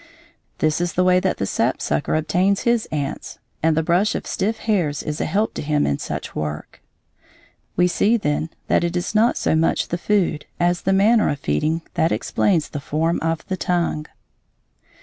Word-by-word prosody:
This 155 +2 +1
is 175 0 -1
the 180 - +2
way 180 0 +4
that 190 0 -1
the 100 - -1
sapsucker 75 - 0
obtains 180 +5 +1
his 235 -2 +1
ants, 145 -1 -4 0.2
and 160 0 +2
the 160 - +2
brush 180 +6 +2
of - - -4
stiff 215 +4 -1
hairs 180 -11 0
is 150 0 -3
a - - 0
help 210 +3 0
to - - -4
him 150 0 +1
in 70 - 0
such - - -5
work. 75 0 -5 0.9
We 180 +1 +4
see, 215 +6 +2
then, 155 -4 -1 0.2
that - - +2
it 170 +1 -1
is 175 +3 -3
not 225 +3 +3
so - - +1
much 160 +1 +1
the 175 - -2
food 170 -3 0
as 175 0 +1
the 195 - 0
manner 210 +4 +4
of 145 - -1
feeding 155 - -1
that 165 - +1
explains 175 -7 +1
the 145 - -5
form 160 +4 -1
of 165 0 -1
the 185 - -3
tongue. 170 -4 -1
170 Hz, 190 wpm, -21 LUFS, 155-190 Hz, 0.9 s, way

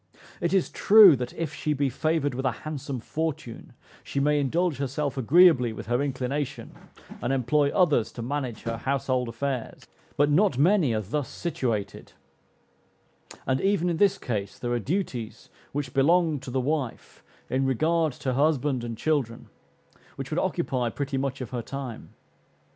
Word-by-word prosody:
It 170 - 0
is 190 -2 +1
true, 205 -6 +8
that 125 0 -4
if 160 -3 -3
she 150 - -1
be 140 -1 0
favored 145 +1 0
with 130 +2 -4
a 130 - +2
handsome 145 -3 -5
fortune, 155 -1 -5 0.3
she - - -3
may 150 +1 +2
indulge 160 +2 0
herself 140 +1 -2
agreeably 135 -2 +5
with - - -8
her 120 +3 0
inclination, 135 -1 -3 0.5
and 120 - -1
employ 140 +2 +2
others 145 - +2
to 120 - -6
manage 130 -3 -4
her 115 0 -3
household 130 -1 -1
affairs; 130 +1 -4 0.3
but 145 +1 +3
not 180 -2 +3
many 155 - +3
are 110 - 0
thus 130 +8 -3
situated; 115 - -3 1.3
and, 130 0 0
even 190 -3 +1
in 165 - -2
this 200 0 +3
case, 100 -5 -4
there 120 - -4
are 120 - +1
duties 125 - -4 0.2
which 140 -3 -4
belong 160 +2 +3
to 130 - -9
the 130 +1 -1
wife, 135 -2 -3 0.3
in 135 +1 0
regard 160 +5 +1
to 130 - -4
her - - +1
husband 145 -4 +1
and 115 -1 -5
children, 135 -7 -1 0.7
which - - -7
would - - 0
occupy 125 -3 -1
pretty 135 +2 -3
much 135 0 -3
of 125 - -6
her 125 -2 -3
time. 130 -2 -7
140 Hz, 165 wpm, -26 LUFS, 125-155 Hz, 1.3 s, true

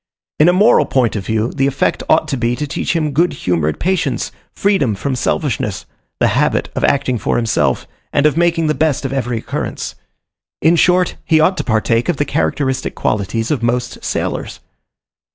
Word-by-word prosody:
In 155 +3 +6
a - - +4
moral 205 +5 +4
point 125 -4 +1
of 100 -3 -4
view, 110 +1 0
the 135 -1 +1
effect 135 -1 0
ought 160 0 +4
to 140 - 0
be, 120 -1 0
to 150 - -3
teach 145 - -2
him 155 -3 0
good 170 +6 +2
humoured 80 -4 -1
patience, 185 +2 -1 0.2
freedom 170 - +1
from 135 +6 -2
selfishness, 120 -5 -2 0.3
the - - +3
habit - - +1
of - - -2
acting 130 -4 +1
for - - -1
himself, 115 -2 +1 0.3
and 145 - +2
of 150 - +3
making 170 -1 +2
the 155 - +2
best 155 -3 0
of 135 - -2
every 125 -3 -1
occurrence. - - -4 0.7
In 165 +2 +4
short, 180 +1 +2
he 160 - +3
ought 170 +5 +3
to - - -1
partake 115 +2 +1
of 170 - +1
the 145 - 0
characteristic 135 -3 -1
qualities 110 +4 -1
of 140 -6 0
most 120 +1 -2
sailors. - - -3
135 Hz, 185 wpm, -17 LUFS, 115-160 Hz, 0.7 s, In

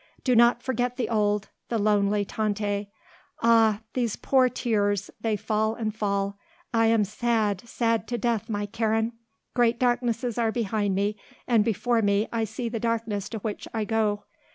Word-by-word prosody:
Do 250 -2 +3
not 235 +1 +5
forget 245 -1 -1
the 250 - -1
old, 210 -2 +1 0.2
the 230 - 0
lonely 205 -1 +2
Tante. 205 -2 -2 0.6
Ah, 225 -2 +4
these 240 -4 0
poor 260 -2 +3
tears, 205 -5 0
they 220 -1 +1
fall 215 +1 0
and 220 -2 -2
fall. 200 -1 -1 0.3
I 225 -1 +4
am 225 -1 +4
sad, 215 -2 0
sad 230 -2 0
to 240 - -2
death, 230 -1 -1
my 205 -1 -1
Karen. 225 +1 0 0.4
Great 235 -1 +3
darknesses 240 -1 0
are 225 -1 +2
behind 215 -4 0
me, 205 +2 0 0.3
and 230 -4 +4
before 230 +2 +1
me 205 +1 +2
I 225 -1 +1
see 225 +3 -4
the 230 0 -3
darkness 220 -3 -2
to 225 - -4
which 210 0 -4
I 220 -1 0
go. 210 -2 0
220 Hz, 165 wpm, -26 LUFS, 205-235 Hz, 0.6 s, not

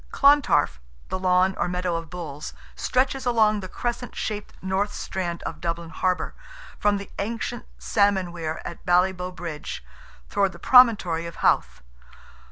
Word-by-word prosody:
Clontarf, 275 - +4 0.3
the - - -2
lawn 185 +1 +3
or - - +1
meadow 180 -1 -1
of 165 -1 -4
bulls, 160 -5 -7 0.2
stretches 260 0 0
along 215 -3 +4
the 185 - -6
crescent 240 +3 -4
shaped 210 -1 -4
north 190 +2 -1
strand 175 -4 -4
of - - -6
Dublin 170 -1 -3
harbour, 185 +2 -1 0.5
from 205 -1 +3
the 200 - -8
ancient 220 - -3
salmon 190 - +2
weir 160 -2 -4
at 170 - -7
Ballyboght 180 0 +2
bridge, 160 - -6 0.4
towards 195 -2 +1
the - - -11
promontory 205 -10 +5
of 170 - -8
Howth. - - +2
185 Hz, 145 wpm, -25 LUFS, 170-210 Hz, 0.5 s, promontory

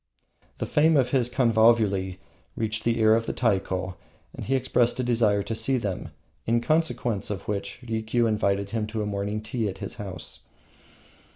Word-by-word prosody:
The - - -2
fame 155 +1 +4
of 130 -3 +2
his 125 -3 +2
convulvuli 110 -6 +3 0.4
reached 110 0 -2
the 115 0 +2
ear 110 -1 +5
of 115 0 +1
the - - -1
Taiko, 95 -5 -1 0.4
and - - -7
he 135 - +2
expressed 125 -2 +1
a - - +1
desire 110 -4 +2
to 115 - -4
see 115 +4 +1
them, 100 -6 -3 0.4
in 115 +1 +3
consequence 120 -6 0
of 100 -4 -5
which 100 0 -3
Rikiu 115 +1 0
invited 100 -2 0
him 110 -2 -1
to 110 0 -3
a - - -2
morning 105 +1 -3
tea 110 -1 -1
at 95 - -7
his - - -6
house. 90 -5 -6
110 Hz, 175 wpm, -26 LUFS, 100-120 Hz, 0.4 s, ear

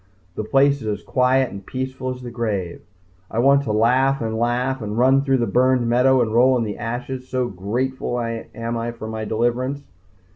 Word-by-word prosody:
The 110 - -4
place 140 +4 +3
is 110 - -6
as 105 -1 -3
quiet 130 0 +2
and 100 0 -8
peaceful 130 +3 -4
as 125 0 -6
the 120 - -7
grave. 105 -7 -3 0.5
I - - -6
want 140 +3 +5
to 110 - -1
laugh 130 +5 +3
and 110 -1 -2
laugh 125 +2 0
and 105 0 -4
run 130 +3 +4
through 135 -1 +2
the 120 - 0
burned 125 +3 +2
meadow 125 +2 +4
and 110 -1 -3
roll 125 +2 +5
in 120 - 0
the 105 -2 -5
ashes 125 +2 -5
so 125 -1 -1
grateful 120 +6 -2
am 115 0 -4
I 120 +1 -3
for 115 -2 -8
my 110 0 -4
deliverance. 120 +6 -1
120 Hz, 195 wpm, -21 LUFS, 115-130 Hz, 0.5 s, want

